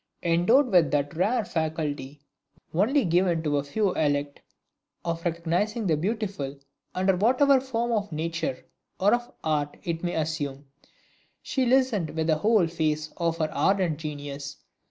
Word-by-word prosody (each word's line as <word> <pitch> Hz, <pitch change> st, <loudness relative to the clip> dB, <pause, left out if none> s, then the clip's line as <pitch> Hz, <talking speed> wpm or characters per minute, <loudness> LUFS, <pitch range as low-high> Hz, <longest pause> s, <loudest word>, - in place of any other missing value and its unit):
Endowed 200 Hz, +11 st, +3 dB
with 175 Hz, -6 st, +5 dB
that 145 Hz, +2 st, -1 dB
rare 215 Hz, +6 st, +1 dB
faculty 150 Hz, -4 st, -3 dB, 0.5 s
only 230 Hz, -, +2 dB
given 175 Hz, -1 st, +2 dB
to 145 Hz, -2 st, +1 dB
a 140 Hz, -, 0 dB
few 190 Hz, +6 st, 0 dB
elect, 145 Hz, -2 st, -1 dB, 0.6 s
of 165 Hz, 0 st, -2 dB
recognizing 175 Hz, +7 st, -1 dB
the 165 Hz, -4 st, +3 dB
Beautiful 190 Hz, -6 st, -3 dB, 0.4 s
under 190 Hz, +1 st, +2 dB
whatever 260 Hz, +7 st, +4 dB
form 240 Hz, -2 st, -2 dB
of 210 Hz, -3 st, -1 dB
nature 160 Hz, -3 st, -3 dB, 0.3 s
or 200 Hz, +2 st, +4 dB
of 240 Hz, 0 st, -1 dB
art 150 Hz, -2 st, -1 dB
it 165 Hz, -1 st, -3 dB
may 175 Hz, -, -1 dB
assume, 145 Hz, -3 st, -3 dB, 0.8 s
she 260 Hz, -2 st, 0 dB
listened 245 Hz, -9 st, +2 dB
with 160 Hz, -1 st, 0 dB
the 155 Hz, -1 st, +2 dB
whole 210 Hz, +2 st, +3 dB
force 155 Hz, -2 st, -2 dB
of 165 Hz, -1 st, 0 dB
her 155 Hz, -2 st, -1 dB
ardent 175 Hz, 0 st, +1 dB
genius. 145 Hz, -2 st, -6 dB
165 Hz, 145 wpm, -26 LUFS, 150-205 Hz, 0.8 s, with